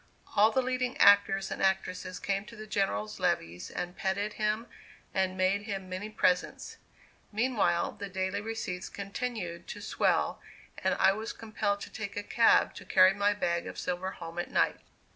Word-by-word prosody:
All 210 +2 +6
the 260 +4 +1
leading 255 0 -1
actors 200 -1 +5
and - - -4
actresses 185 -1 0
came 195 +1 -1
to 230 - -12
the 215 0 -8
General's 210 0 -1
levees 90 - -1
and 175 +1 -5
petted 200 +2 -1
him 215 +1 -1 0.5
and 190 -1 0
made 185 +2 +2
him 195 -2 -4
many 185 +3 -4
presents. 180 -4 0 0.5
Meanwhile, 215 -6 +1
the 200 - -5
daily 190 +1 -2
receipts 210 -5 -4
continued 200 -4 -5
to 205 - -6
swell, 205 - +1 0.4
and - - +1
I 190 - +5
was 220 +3 -4
compelled 215 -2 -2
to - - -7
take 205 -2 -6
a 205 - -2
cab 230 +2 +4
to - - -8
carry 185 0 +6
my 205 +1 +2
bag 170 -4 -1
of - - -7
silver 180 +1 -2
home 165 0 -7
at 175 - -3
night. - - +2
200 Hz, 170 wpm, -30 LUFS, 185-215 Hz, 0.5 s, All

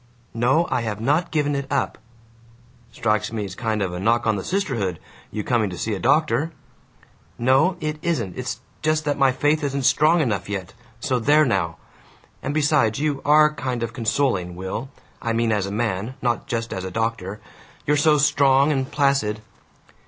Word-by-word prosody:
"No, 130 +9 +2
I 125 - +1
have 110 -3 -3
not 150 +9 +1
given 145 -2 0
it 140 -1 -3
up!" 140 - -1 0.9
"Strikes 110 -1 0
me 110 -2 -3
it's 95 - -7
kind 110 -1 -1
of 90 -2 -3
a 90 - -4
knock 115 +5 +2
on 110 -1 +2
the 95 - -4
sisterhood, 125 - -1 0.3
your 105 - -4
coming 115 -3 +1
to 90 - -7
see 110 +5 -2
a 100 - -3
doctor!" 150 - +2 0.9
"No, 135 +9 +3
it 155 -1 -3
isn't. 125 - -1
It's 125 -1 -4 0.2
just 155 0 +1
that 145 -1 -1
my 135 -1 +5
faith 145 +4 +1
isn't 140 -1 -1
strong 155 +6 +4
enough 100 - -1
yet. 95 -2 -4 0.3
So 125 +1 0
there 150 +6 +4
now! 85 - 0 0.6
And 135 - -3
besides, 145 -7 +2
you 145 -1 -1
ARE 150 +1 +5
kind 130 -5 -3
of 115 0 -4
consoling, 110 -7 0
Will. 95 +8 -5 0.3
I 115 -1 -1
mean 115 0 +1
as 100 -3 0
a - - -5
man, 110 +2 -2
not 120 -2 -1
just 115 -1 -3
as 95 - -4
a 95 - -4
doctor. 105 -1 -3 0.5
You're 150 - +3
so 150 +1 +4
strong 140 -1 +4
and 135 -2 -1
placid." 135 -7 +1
125 Hz, 180 wpm, -23 LUFS, 110-145 Hz, 0.9 s, my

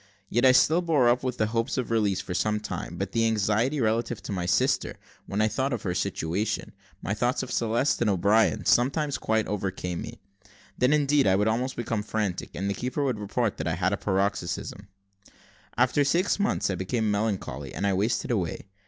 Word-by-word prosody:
Yet 120 +3 +2
I - - +8
still 155 +7 +4
bore 150 -8 +3
up 120 +1 +2
with 130 -1 -3
the 110 - +2
hopes 115 +4 -1
of 125 -2 -2
release 105 -4 +1
for - - -6
some 105 +3 0
time; 105 - -6
but - - -3
the 115 -1 +2
anxiety 110 +6 +1
relative 115 0 0
to - - -6
my 90 -3 -2
sister, 90 - +1 0.3
when 100 +2 -1
I - - +4
thought 130 +6 -1
of 115 - -4
her 90 - -1
situation, 100 +3 -2 0.3
my 100 - -1
thoughts 120 +4 0
of - - -7
Celeste 115 +5 +1
and 115 - +3
of 100 - +2
O'Brien, 105 +4 +2
sometimes 140 +4 +2
quite 110 0 +1
overcame 95 -3 -3
me; - - -8 0.6
then, 125 +2 +2
indeed, 145 -3 +3
I 95 - +4
would 105 +2 +2
almost 125 +4 0
become 115 -2 -2
frantic, 105 -3 -3
and 95 +3 -2
the 100 - 0
keeper 125 +6 -2
would 130 -6 -1
report 105 +2 -1
that 80 - -3
I 80 - 0
had 90 +2 +1
had - - -2
a - - 0
paroxysm. 95 -1 -2 0.9
After 130 +4 +3
six 175 +9 +1
months 200 - +1
I 95 -1 -3
became 110 +2 0
melancholy, 100 - -2
and 100 - -3
I 100 - +2
wasted 105 +6 0
away. 95 -7 -2
110 Hz, 205 wpm, -26 LUFS, 100-125 Hz, 0.9 s, I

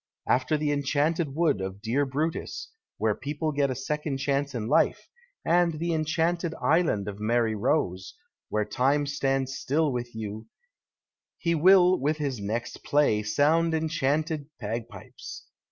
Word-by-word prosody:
After 130 +4 +2
the 150 -1 0
enchanted 145 +1 0
wood 160 - +2
of 95 +1 -5
Dear 120 +6 0
Brutus, 155 +7 -3 0.3
wlicre - - 0
people 150 +2 -2
get 140 -1 +1
a 130 - -2
second 150 +1 -3
chance 140 0 -1
in 110 -2 -3
life, - - +2 0.4
and 170 -1 +3
the 170 +2 -1
enchanted 165 +2 0
island 150 - +2
of 100 0 -6
Mary 115 +1 +1
Rose, 95 - -1 0.3
where 105 0 0
time 135 +7 +1
stands 135 -2 -1
still 150 +3 0
with 120 -2 -4
you, 110 -1 -6 0.9
he 170 -1 0
will 180 +2 +6
with 150 +3 0
his 140 -6 -2
next 115 +4 -4
play 145 -8 +2
sound 155 +9 +2
enchanted 155 -1 -1
bagpipes. 115 +1 -7
145 Hz, 140 wpm, -27 LUFS, 120-160 Hz, 0.9 s, will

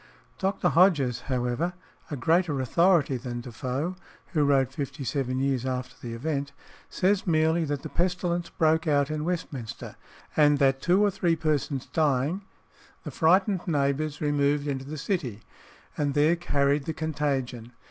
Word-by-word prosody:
Dr. 190 -2 +1
Hodges, 150 -10 +3
however, 125 +7 -1 0.4
a 150 - -3
greater 165 0 +1
authority 155 0 +3
than 120 -1 -5
Defoe, 130 +8 -3 0.4
who 155 -3 +3
wrote 135 -2 +2
fifty 140 -1 -5
seven 130 -2 -1
years 135 -2 0
after 130 -1 -3
the 115 -1 -5
event, 140 +2 -3 0.4
says 190 +1 +1
merely 160 0 +2
that 145 -2 -3
the - - -4
pestilence 175 -1 -1
broke 160 0 +1
out 145 -1 +2
in 155 0 -2
Westminster, 145 -10 -5 0.4
and 145 -1 +5
that 135 -1 +2
two 180 +5 +3
or 205 - +2
three 175 -3 +1
persons 150 -4 -1
dying, 150 +3 0 0.6
the - - -6
frightened 185 +3 +2
neighbours 145 -1 0
removed 145 -1 +1
into 135 -2 -3
the 155 +3 -6
City, 140 - -3 0.5
and 145 -2 -1
there 150 +3 +4
carried 145 -4 +1
the 160 - -2
contagion. 135 -7 -2
145 Hz, 145 wpm, -27 LUFS, 135-165 Hz, 0.6 s, and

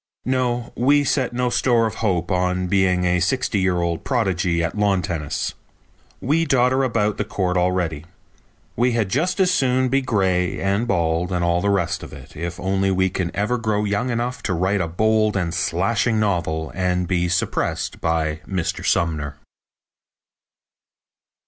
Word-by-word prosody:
No, 125 -2 -1
we 145 +4 +3
set 130 -2 0
no 125 0 -1
store 120 -3 +2
of 110 - -2
hope 90 -4 0
on 90 0 0
being 90 -1 +2
a 90 0 +2
sixty 100 +3 0
year 90 -2 +1
old 85 -1 -2
prodigy 95 - 0
at 80 - -2
lawn 100 -3 +1
tennis. 80 -6 -3 0.7
We 155 +5 +1
dodder 130 -2 +2
about 110 -5 0
the - - 0
court 90 -2 -2
already. 90 -4 0 0.7
We 120 +1 +2
had 110 -4 0
just 175 - 0
as 185 -1 +4
soon 130 -3 +2
be 135 +2 +2
gray 95 -7 0
and 100 +4 0
bald 85 -2 0
and 90 -1 0
all 85 +1 +1
the 100 - +1
rest 90 -4 0
of - - -10
it - - -12
if 85 +3 -5
only 95 +1 0
we 95 0 +1
can 90 -2 -2
ever 115 +5 0
grow 105 -2 0
young 105 +5 -1
enough 120 +1 -2
to - - +1
write 95 +3 +1
a 85 - -1
bold 110 +4 +1
and 85 -3 -1
slashing 100 +6 0
novel 85 -6 -1
and 90 -1 0
be 90 -1 0
suppressed 90 - -1
by 80 -1 -1
Mr. 95 -4 -2
Sumner. 75 -4 0
95 Hz, 165 wpm, -21 LUFS, 90-120 Hz, 0.7 s, as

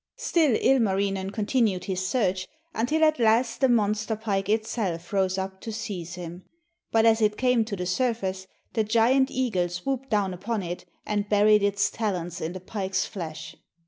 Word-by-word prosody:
Still 310 -9 +2
Ilmarinen 195 -6 +2
continued 210 -3 +1
his 185 -1 -2
search, 185 -3 0 0.3
until 300 +8 +1
at 310 -3 +4
last 230 +2 +2
the 265 - +4
monster 215 -1 +1
pike 205 -3 -2
itself 210 -5 -1
rose 190 -1 +1
up 190 0 -4
to 225 - -5
seize 190 -6 -5
him. 175 0 -8 0.5
But 225 0 +4
as 225 0 +4
it 210 -1 +2
came 250 -3 +3
to 215 -2 -4
the 180 -1 -4
surface, 190 -2 -1 0.3
the 220 - +2
giant 235 +5 +3
eagle 220 -11 0
swooped 265 +9 -3
down 200 -4 +1
upon 200 +3 -3
it, 175 +1 -5 0.2
and 205 -1 -1
buried 210 0 +5
its 200 0 +1
talons 180 -6 -3
in 160 +2 -3
the 185 - -6
pike's 190 +1 -2
flesh. 160 -3 -7
205 Hz, 170 wpm, -26 LUFS, 185-230 Hz, 0.5 s, buried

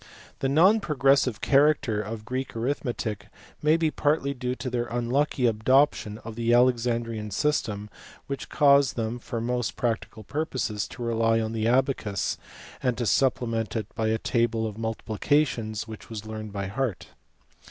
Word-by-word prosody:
The 135 - 0
non 185 +10 +5
progressive 135 - +2
character 140 -6 +3
of 105 +1 -6
Greek 130 +2 -4
arithmetic 115 -4 -3 0.3
may 155 +2 +4
be 160 -2 +1
partly 145 -2 +1
due 125 -1 -3
to 130 - -6
their 120 -1 -1
unlucky 125 +3 0
adoption 115 -1 +2
of 115 - -6
the 115 0 0
Alex 125 -1 +4
andrian 115 -3 -2
system 105 -5 -1 0.4
which 140 -1 -5
caused 140 -2 +4
them 115 +1 -2
for 115 0 -5
most 120 -1 -1
practical 115 -2 -2
purposes 130 -6 -2
to 120 - -8
rely 115 -1 +2
on 110 0 -2
the 110 -1 -1
abacus, 120 - 0 0.4
and 125 -2 0
to 120 - -1
supplement 115 -3 +1
it 110 -2 -4
by 110 - -1
a 110 0 +2
table 115 -1 0
of 110 -2 -4
multi 110 0 -4
plications 115 -2 0
which 110 -1 -10
was 110 -2 -6
learnt 110 -1 -6
by 100 -1 -3
heart. 115 0 -3
120 Hz, 160 wpm, -26 LUFS, 110-135 Hz, 0.4 s, non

